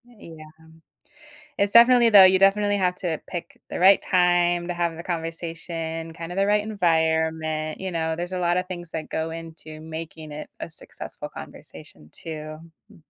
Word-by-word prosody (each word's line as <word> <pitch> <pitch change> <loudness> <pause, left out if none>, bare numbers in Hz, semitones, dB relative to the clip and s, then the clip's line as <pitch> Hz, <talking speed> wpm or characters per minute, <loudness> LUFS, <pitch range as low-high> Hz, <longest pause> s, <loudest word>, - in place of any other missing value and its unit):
Yeah. 170 -10 -13 1.1
It's 200 0 +1
definitely 235 0 +7
though 200 -3 +10
you 185 0 +6
definitely 205 +1 +3
have 180 -2 0
to 165 -4 -3
pick 175 -2 -7
the - - -4
right 190 +2 +6
time 175 -1 +2
to 175 - -2
have 170 -1 -1
the 170 - -7
conversation, 165 -1 -5
kind 165 +1 -7
of - - -7
the 195 - +3
right 210 0 +3
environment, 160 -5 0
you 190 0 -3
know? 160 -2 -1
There's 175 +2 -5
a 185 - -2
lotta 175 0 +1
things 175 -2 -7
that 160 -1 -5
go 160 0 -3
into 160 -1 -9
making 160 -1 -8
it 150 +1 -8
a - - -5
successful 160 - -9
conversation 75 - -11
too, 155 -1 -8 0.3
hmm. - - -17
170 Hz, 170 wpm, -24 LUFS, 160-185 Hz, 1.1 s, though